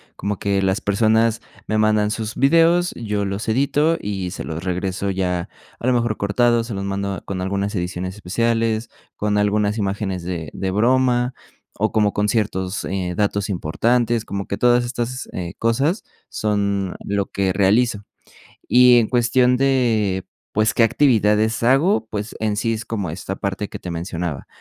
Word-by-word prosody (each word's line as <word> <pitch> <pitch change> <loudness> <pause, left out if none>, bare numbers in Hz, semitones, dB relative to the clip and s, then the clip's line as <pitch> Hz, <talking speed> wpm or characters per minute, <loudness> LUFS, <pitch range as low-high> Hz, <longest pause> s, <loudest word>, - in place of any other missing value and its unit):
Como 100 0 -3
que 100 -1 0
las 95 +1 +1
personas 110 +2 +2 0.3
me 110 - 0
mandan 105 -1 +2
sus 110 -1 -4
videos, 165 +5 +4
yo 105 -3 -2
los 100 +3 -3
edito 145 +7 +2
y 95 -3 -4
se - - -6
los 80 +2 -5
regreso 95 +2 -2
ya 90 -2 -1 0.3
a - - -4
lo - - +4
mejor 120 -3 +1
cortados, 115 +3 +1
se 115 - -5
los 100 0 -3
mando, 100 0 -2
ah, - - -8
con 95 -2 -4
algunas 100 +2 -2
ediciones 90 +1 -3
especiales, 115 +3 0 0.3
con 105 0 0
algunas 105 +1 +1
imágenes 95 -3 -2
de 85 -4 -4
de 95 -1 -2
broma 125 +3 +2 0.5
o 110 - +1
como 105 -2 +2
con 105 +1 0
ciertos, 105 -3 -1
eh, 95 -2 -2
datos 100 -1 0
importantes, 115 +6 0
como 100 -1 -4
que 100 - -3
todas 120 0 +4
estas, 120 +1 -4
eh, 85 -2 -5
cosas 135 - +1 0.3
son 100 -3 -1
lo 100 -1 -1
que 95 -1 0
realizo. 105 +3 +2 0.7
Y 125 -1 +7
en 115 - +2
cuestión 125 +1 +3
de, 115 -8 +1 0.3
pues, 110 +1 +2
qué 115 - +3
actividades 110 -3 +3
hago, 135 - +3
pues 105 +1 -5
en 110 -1 -1
sí 115 +1 0
es 110 0 -5
como 105 -5 -3
esta 95 +4 -5
parte 100 +1 -3
que - - -6
te 90 - -7
mencionaba. 85 -3 -4
105 Hz, 170 wpm, -21 LUFS, 95-120 Hz, 0.7 s, Y